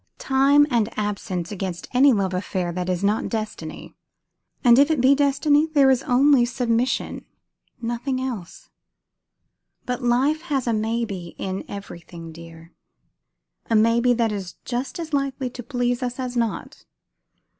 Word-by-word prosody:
"Time 275 +2 +4
and 230 -3 +2
absence 200 -4 -3
against 185 -3 -5
any 270 +3 +6
love 195 -5 0
affair 180 -1 -2
that 180 +1 -3
is 180 +1 -1
not 210 +2 +1
destiny! 220 -2 -5 0.7
And 240 0 +6
if 285 +2 +5
it 315 -4 +1
be 260 +3 +5
destiny, 290 +2 +3
there 285 -4 +4
is 260 -1 +2
only 275 -1 +4
submission, 240 0 -1 0.6
nothing 240 +3 -2
else. 240 -9 -6 1.1
But 250 +1 -3
life 260 +6 +2
has 285 -7 -2
a 235 - +1
'maybe' 215 -5 -3
in 190 0 -4
everything 170 -4 -9
dear; 165 0 -13 1.0
a 225 - +2
maybe 230 +3 +4
that 230 -2 +1
is 195 -4 -5
just 250 +2 -3
as 320 -2 -6
likely 275 -2 -1
to 245 - -8
please 245 0 -1
us 250 0 -3
as 250 -1 -4
not." 230 -2 -3
240 Hz, 145 wpm, -23 LUFS, 200-265 Hz, 1.1 s, any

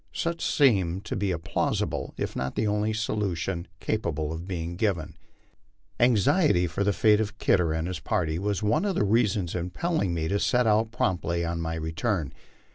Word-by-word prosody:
Such 170 0 -2
seemed 95 - +2
to - - -3
be 100 0 -1
a 90 - 0
plausible 80 - -2
if - - -3
not 65 0 -3
the 110 - 0
only 105 +1 +1
solution 95 -5 -2
capa 110 -6 -1
ble 75 +1 -3
of 85 +2 -7
being 85 -2 -4
given. 90 -6 -1 0.8
Anxiety 125 - +4
for 90 +4 -1
the 105 - +2
fate 105 +2 +4
of 110 0 -4
Kidder 90 -6 +2
and 80 +1 -1
his 90 - -4
party 80 -1 -1
was 100 +1 -1
one 110 - +2
of 200 -3 0
the 105 - +2
reasons 100 -4 +1
impel 90 - -2
ling 90 - 0
me 80 -1 -1
to 100 +4 0
set 125 +3 +2
out 110 0 +3
promptly 85 -6 0
on 85 0 -2
my 80 0 -2
return. 80 - -2
95 Hz, 190 wpm, -27 LUFS, 85-110 Hz, 0.8 s, Anxiety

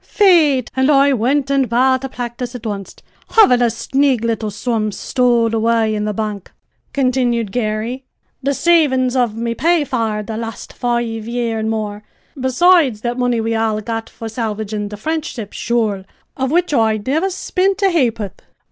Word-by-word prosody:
"Faith, 315 - +3
and 265 +2 +2
I 280 -1 +5
wint 265 +4 +1
an' 275 -1 +3
bought 260 +3 +2
a 270 - -4
practis' 245 0 -5
at 240 - -8
onst, 200 -3 -6 0.3
havin' 255 - +6
a 240 - +4
snig 265 +1 0
little 225 -2 -1
sum 215 0 -2
stowed 240 0 +1
away 225 -1 +2
in 210 0 -2
the 210 - -1
bank," 210 -2 -4 0.4
continued 250 -5 0
Garry, 230 +3 -2 0.4
"the 280 +1 0
savin's 265 -7 +3
of 240 -4 +1
me 230 0 -2
pay 335 +5 +2
for 225 -6 -2
the 220 +1 -5
last 225 -1 -7
five 235 -2 -2
year 235 -2 -2
an' 220 0 -1
more, 210 -2 -3 0.3
besides 265 -2 +3
that 240 +1 -3
money 245 -2 +1
we 225 0 -1
all 220 -1 0
got 225 +1 -4
for 225 - -8
salvagin' 215 -2 -3
the 210 - -7
French 315 +7 -2
ship, 220 -6 -7
sure, 220 -5 -1 0.3
of 265 0 -1
which 345 +1 +1
I 220 -4 +3
nivver 290 - 0
spint 385 +2 -1
a 390 - +4
ha'poth. 230 - -1
240 Hz, 170 wpm, -18 LUFS, 220-270 Hz, 0.4 s, havin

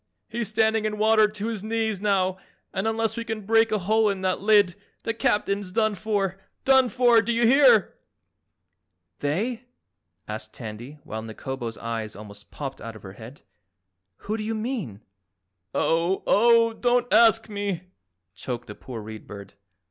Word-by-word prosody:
He's 235 -1 -3
standing 220 +1 +1
in 210 0 -2
water 215 0 +5
to 210 0 -6
his 225 -3 -3
knees 220 -2 -1
now 190 -2 +1 0.3
and 195 +2 -1
unless 225 0 0
we 230 - -3
can 225 -1 -4
break 225 +1 +4
a 215 - +2
hole 215 +3 +2
in 195 -2 -3
that 185 -1 0
lid 205 -3 +4 0.3
the 230 - -1
Captain's 205 -5 0
done 215 +1 +1
for 200 -2 -2 0.3
done 265 -2 +5
for, 240 -2 +4
do 235 - -2
you 235 0 +2
hear?" 245 - +5 1.3
"They?" 220 - -2 0.6
asked 105 +1 -6
Tandy 120 +5 -8
while 110 +1 -6
Nikobo's 115 +1 -6
eyes 115 -2 -4
almost 105 -1 -12
popped 135 -2 -7
out 115 0 -7
of 110 - -13
her 95 - -9
head, 115 +7 -12 0.8
"Who 215 +2 -2
do 215 - -4
you 225 +1 -2
mean?" 215 - -4 0.7
"Oh, 170 +3 +1
oh, 230 +1 +4
don't 245 +1 +1
ASK 225 -1 +5
me!" 200 -4 -3 0.5
choked 120 +5 -5
the 105 - -8
poor 115 +1 -8
Read 110 0 -9
Bird. 100 -1 -10
210 Hz, 160 wpm, -25 LUFS, 135-225 Hz, 1.3 s, water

